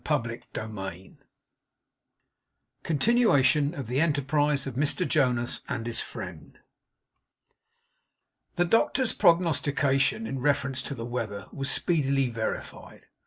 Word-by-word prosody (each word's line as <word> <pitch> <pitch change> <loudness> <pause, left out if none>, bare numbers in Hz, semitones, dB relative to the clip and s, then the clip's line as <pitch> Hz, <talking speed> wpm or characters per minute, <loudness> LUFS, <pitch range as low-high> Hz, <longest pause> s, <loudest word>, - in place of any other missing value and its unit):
CHAPTER 120 -6 -1
FORTY 95 -4 -6
TWO - - -28 1.6
CONTINUATION 150 - +3
OF 140 - -5
THE 125 +6 0
ENTERPRISE 145 -2 +1
OF 135 - -5
MR 150 +7 0
JONAS 125 -6 +1
AND 125 -4 -3
HIS 115 -1 -3
FRIEND - - -9 2.0
The 175 - +2
doctor's 225 +5 +2
prognostication 165 0 +2
in 135 - -4
reference 140 -1 0
to 140 - -5
the 115 -2 -6
weather 110 -5 -4
was 135 0 -2
speedily 140 -6 +1
verified. 110 -1 -5
140 Hz, 110 wpm, -27 LUFS, 120-155 Hz, 2.0 s, CONTINUATION